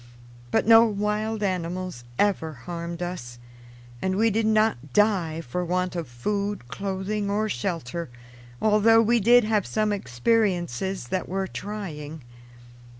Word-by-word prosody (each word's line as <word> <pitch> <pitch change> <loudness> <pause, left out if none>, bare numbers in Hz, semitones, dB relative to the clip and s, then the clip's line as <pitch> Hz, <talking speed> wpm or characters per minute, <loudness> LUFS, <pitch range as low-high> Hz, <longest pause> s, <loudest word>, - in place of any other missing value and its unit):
But - - +2
no 225 +1 +8
wild 210 0 -1
animals 180 -6 -3
ever 185 -6 +1
harmed 170 +6 -6
us, 125 -10 -6 0.6
and 190 0 0
we 225 +3 +3
did 220 +1 +1
not 215 - +1
die 185 -7 +2
for 165 +5 -3
want 180 +1 -1
of 170 -4 -3
food, 200 +6 -3
clothing, 195 +5 -3
or 210 +2 0
shelter, 170 - -3 0.5
although 220 +1 +5
we 235 +2 +3
did 240 +3 +6
have 215 -2 +1
some 215 -1 0
experiences 185 - 0
that 185 - -2
were 190 +1 -1
trying. 160 -8 -6
190 Hz, 130 wpm, -25 LUFS, 170-210 Hz, 0.6 s, no